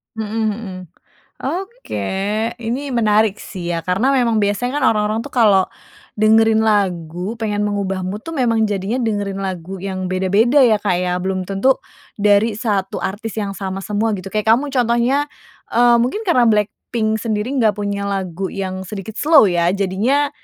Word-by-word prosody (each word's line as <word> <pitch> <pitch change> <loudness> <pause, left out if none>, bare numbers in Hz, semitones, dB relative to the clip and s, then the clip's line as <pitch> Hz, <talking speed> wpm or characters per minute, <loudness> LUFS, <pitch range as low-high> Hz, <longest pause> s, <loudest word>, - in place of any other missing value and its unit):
Mhm 220 0 -3
mhm. 205 -4 -7 0.7
Oke, 400 +8 -5 0.6
ini 255 +4 -3
menarik 215 -2 +3
sih 175 -3 -5
ya. 165 - -2
Karena 195 - +1
memang 235 -4 +2
biasanya 230 +7 0
kan 265 - +1
orang-orang 210 +1 0
tuh 285 - -10
kalau 205 -6 +4 0.5
dengerin 220 +1 +4
lagu 185 -3 0
pengen 210 -1 0
mengubah 195 -2 -2
mood 205 +3 -4
tuh 330 - -8
memang 230 -3 +2
jadinya 205 +5 -2
dengerin 205 -3 -2
lagu 185 0 -5
yang 190 -1 -4
beda-beda 200 +9 +3
ya, 225 -4 +5
Kak 205 -3 0
ya? 180 -1 -1
Belum 185 +1 -2
tentu 200 +8 +1 0.4
dari 205 +2 +3
satu 205 -4 -2
artis 205 +2 -4
yang 205 -2 -2
sama 195 0 -4
semua 210 +2 -1
gitu. 190 +1 -7
Kayak 215 +2 +3
kamu 280 +5 0
contohnya, 250 +2 +2 0.5
eee, 240 0 +5
mungkin 250 - 0
karena 255 -10 +4
BLACKPINK 220 +1 0
sendiri 215 +1 -2
nggak 215 -3 +3
punya 200 -1 -2
lagu 190 -2 -3
yang 190 -1 -4
sedikit 205 +2 -7
slow 295 - +5
ya, 175 +1 +1
jadinya, 215 +10 +1
210 Hz, 160 wpm, -19 LUFS, 195-235 Hz, 0.7 s, ya